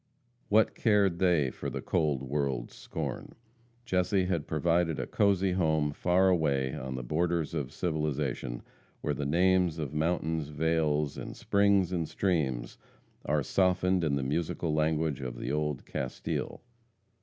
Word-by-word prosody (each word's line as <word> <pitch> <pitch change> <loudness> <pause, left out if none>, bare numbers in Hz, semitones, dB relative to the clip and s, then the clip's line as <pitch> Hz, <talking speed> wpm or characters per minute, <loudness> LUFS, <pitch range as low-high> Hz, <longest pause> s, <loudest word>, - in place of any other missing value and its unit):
What 110 +1 +4
cared 100 -6 +2
they 85 -8 +3
for - - -5
the - - -4
cold 75 -6 0
world's 70 -3 -2
scorn? - - -6 0.5
Jesse 90 +1 +1
had 85 -5 -1
provided 80 +1 +1
a - - -1
cosy 100 -2 +2
home 80 -5 +1
far 90 +5 +3
away 70 -7 +1
on 65 0 -5
the 65 - -4
borders 80 +4 0
of 70 -4 -3
civilization, 75 -7 -2 0.4
where 75 - -1
the 70 0 -3
names 90 +1 +3
of 75 -3 -4
mountains, 80 -1 0
vales, 75 -1 0
and - - -7
springs, 100 -2 +3
and 85 -4 -1
streams, 75 -10 -1 0.5
are 75 0 +1
softened 90 +2 +2
in 75 -3 +1
the 70 - -1
musical 75 +3 -1
language 80 -2 0
of 60 -2 -5
old 75 -2 -2
Castile. 65 - -4
80 Hz, 140 wpm, -30 LUFS, 70-90 Hz, 0.5 s, What